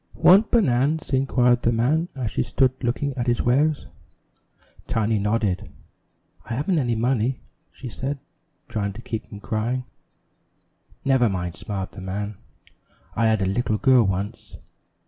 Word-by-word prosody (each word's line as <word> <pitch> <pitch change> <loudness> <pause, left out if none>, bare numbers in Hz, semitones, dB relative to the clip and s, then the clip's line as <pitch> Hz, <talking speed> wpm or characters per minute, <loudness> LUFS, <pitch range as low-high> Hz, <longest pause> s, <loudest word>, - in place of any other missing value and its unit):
"Want 200 +4 +6
banan's?" 150 - +2
inquired 125 -2 +3
the 120 - +2
man 145 +9 +1
as 125 -5 -3
she - - 0
stood 125 +2 +2
looking 135 +4 -1
at 125 -1 -3
his 120 -1 +1
wares. 145 +5 +2 1.0
Tiny 110 -1 +1
nodded. 105 -5 0 0.7
"I 115 - -4
haven't 155 +6 +1
any 120 -4 0
money," 120 +1 0 0.3
she 135 - -9
said, 135 +4 -4 0.5
trying 100 -2 -2
to 115 - -10
keep 110 -1 -5
from 100 - -10
crying. 115 +5 -2 1.2
"Never 130 -4 +4
mind," 90 -3 -3
smiled 95 0 -5
the 100 - -10
man, 100 +2 -4 0.8
"I 115 0 +2
had 110 -3 +2
little 110 +2 0
girl 130 -1 +5
once. 100 +3 -3
120 Hz, 140 wpm, -24 LUFS, 105-130 Hz, 1.2 s, Want